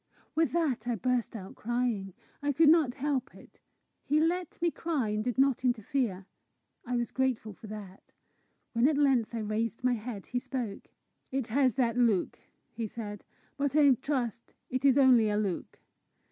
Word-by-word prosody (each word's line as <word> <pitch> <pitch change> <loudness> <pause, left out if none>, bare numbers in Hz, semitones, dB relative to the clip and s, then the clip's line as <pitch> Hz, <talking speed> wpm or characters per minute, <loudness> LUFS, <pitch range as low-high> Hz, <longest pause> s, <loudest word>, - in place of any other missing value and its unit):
With 325 0 +2
that 285 -9 0
I 240 - +1
burst 245 +1 -1
out 190 -3 -7
crying. 230 -5 -2 0.3
I 285 0 0
could 310 +2 +5
not 305 -6 +4
help 275 -2 -2
it. - - -17 0.4
He 300 +2 +2
let 340 +2 0
me 340 0 +1
cry, 305 -11 -1
and 210 0 -1
did 245 -1 -2
not 270 -2 +3
interfere. 235 -5 0 0.6
I 250 0 -3
was 240 -1 -1
grateful 255 -5 -1
for 215 - -12
that. 205 -3 -10 0.6
When 235 +3 +4
at 300 - 0
length 260 -6 +2
I 225 - -2
raised 220 +2 -2
my 250 -1 +3
head, 220 -3 -5
he 245 - -2
spoke. 245 -5 -5 0.4
"It 265 -3 -2
has 255 -1 +2
that 240 -2 +1
look," 225 -7 +2 0.3
he 225 -1 -4
said; 205 -2 -7 0.3
"but 285 0 0
I 290 -2 +6
trust 250 -3 -3 0.2
it 260 +2 -1
is 275 -1 +6
only 250 -5 +6
a 210 - 0
look. 200 -4 -3
245 Hz, 175 wpm, -30 LUFS, 220-275 Hz, 0.6 s, I